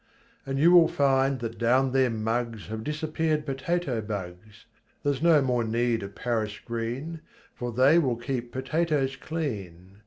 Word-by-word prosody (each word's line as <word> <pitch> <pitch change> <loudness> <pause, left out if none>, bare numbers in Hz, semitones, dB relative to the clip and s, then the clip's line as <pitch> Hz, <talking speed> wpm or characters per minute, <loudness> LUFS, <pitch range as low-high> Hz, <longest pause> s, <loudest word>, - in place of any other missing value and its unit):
And 135 0 -2
you 165 +5 +5
will 175 -2 +8
find 135 -2 +2
that 115 -1 -5
down 130 +3 +3
their 130 -1 +3
muggs 115 0 -2
Have 110 0 -5
disappeared 155 +1 -1
potato 135 -2 -1
bugs, 100 -1 -7 0.4
Theres 145 -1 0
no 160 -4 +5
more 125 -2 +1
need 115 +1 0
of 100 0 -8
Paris 110 -4 -2
green 120 +8 -4 0.3
For 120 -1 -5
they 130 +8 +5
will 130 -7 +1
keep 120 -1 -4
potatoes 140 0 0
clean. 100 - -5
130 Hz, 150 wpm, -27 LUFS, 115-150 Hz, 0.4 s, will